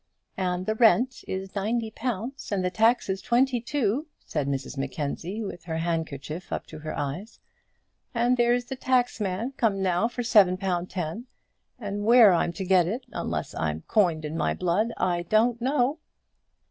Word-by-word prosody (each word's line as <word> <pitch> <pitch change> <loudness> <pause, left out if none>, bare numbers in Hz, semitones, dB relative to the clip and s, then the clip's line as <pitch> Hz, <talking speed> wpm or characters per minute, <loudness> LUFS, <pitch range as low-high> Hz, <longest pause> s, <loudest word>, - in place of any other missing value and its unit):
"And 180 -1 -1
the 215 - +1
rent 240 +3 +3
is 190 0 -4
ninety 220 +3 -1
pounds, 245 +3 -4
and 190 -3 0
the 180 - 0
taxes 220 -3 +2
twenty 245 0 +2
two," 270 +2 -1 0.2
said 150 -3 -2
Mrs 135 0 -3
Mackenzie, 145 - -3
with 175 -4 -7
her 160 -2 -3
handkerchief 160 -1 -3
up - - -3
to 155 - -10
her 155 0 -5
eyes; 155 +11 -5 0.7
"and 240 +1 +2
there's 240 0 +2
the 265 - -5
taxman 245 -4 0
come 210 -4 +1
now 180 +3 +2
for 240 +1 -4
seven 200 -6 +5
pound 185 -2 -2
ten, 185 +7 -4 0.5
and 205 -3 -4
where 225 -3 +7
I'm 170 0 +1
to 190 +1 -5
get 180 -2 +4
it, 235 +7 -3
unless - - -3
I 80 -1 -1
coined 170 -7 +2
my - - 0
blood, 185 +6 +1
I 175 -1 +1
don't 225 +6 +2
know." 270 +3 +1
200 Hz, 160 wpm, -26 LUFS, 175-240 Hz, 0.7 s, where